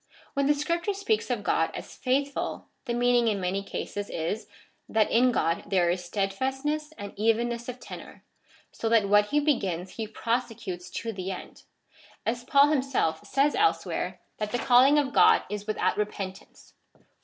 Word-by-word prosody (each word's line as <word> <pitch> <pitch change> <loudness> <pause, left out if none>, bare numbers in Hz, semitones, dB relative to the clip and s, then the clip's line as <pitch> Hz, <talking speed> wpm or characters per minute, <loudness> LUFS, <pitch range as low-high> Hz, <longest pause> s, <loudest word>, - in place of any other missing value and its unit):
When 280 0 +1
the 295 - +4
Scripture 340 +7 -1
speaks 425 +2 0
of - - -1
God - - +2
as - - -8
faithful 275 +2 -1 0.2
tlie 240 0 -1
meaning 245 -1 +3
in 210 -3 +1
many 185 +2 -1
cases 205 +1 -5
is, 170 +7 -3 0.4
that 220 -1 +2
in 250 +2 +4
God 165 -7 0
there 175 -3 +2
is 180 0 -2
steadfastness 265 - -2
and 205 -1 -7
evenness 235 +2 0
of 250 0 -6
tenor, - - -10 0.5
so 225 - -3
that 225 -3 +4
what 205 0 +5
he 295 +6 +2
begins 195 - -1
he 220 -1 -3
prosecutes 225 -5 -3
to 230 -1 -4
the 190 -1 -5
end,^ 190 - -8 0.6
as 240 +2 -1
Paul 280 +3 +5
himself 260 - 0
says 280 +2 +2
elsewhere, 415 0 0 0.2
that 210 -1 -2
the 245 - 0
calling 255 +4 +5
of 280 -2 +1
God - - +6
is 210 0 -5
without 215 - 0
repentance 195 -2 -5 0.2
(Rom. - - -29
230 Hz, 165 wpm, -27 LUFS, 200-275 Hz, 0.6 s, God